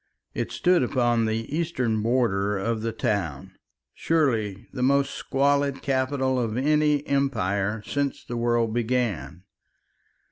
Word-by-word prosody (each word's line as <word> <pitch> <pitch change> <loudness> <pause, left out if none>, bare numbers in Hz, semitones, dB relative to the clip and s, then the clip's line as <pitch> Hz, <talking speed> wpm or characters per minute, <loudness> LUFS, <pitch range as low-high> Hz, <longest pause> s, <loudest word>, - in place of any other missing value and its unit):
It - - -3
stood 180 -1 +3
upon 120 -2 +1
the 115 +5 -2
eastern 130 -10 0
border 105 -4 +1
of 110 +3 -2
the 115 +1 -2
town, 80 -12 -2 0.4
surely 115 -12 0
the 130 - -4
most 140 +2 +2
squalid 140 0 0
capital 130 -1 0
of 115 -2 -2
any 150 +1 +2
empire 105 -7 0
since 145 0 -2
the 120 - -5
world 120 -1 +1
began. 115 -7 -1
120 Hz, 120 wpm, -25 LUFS, 110-140 Hz, 0.4 s, stood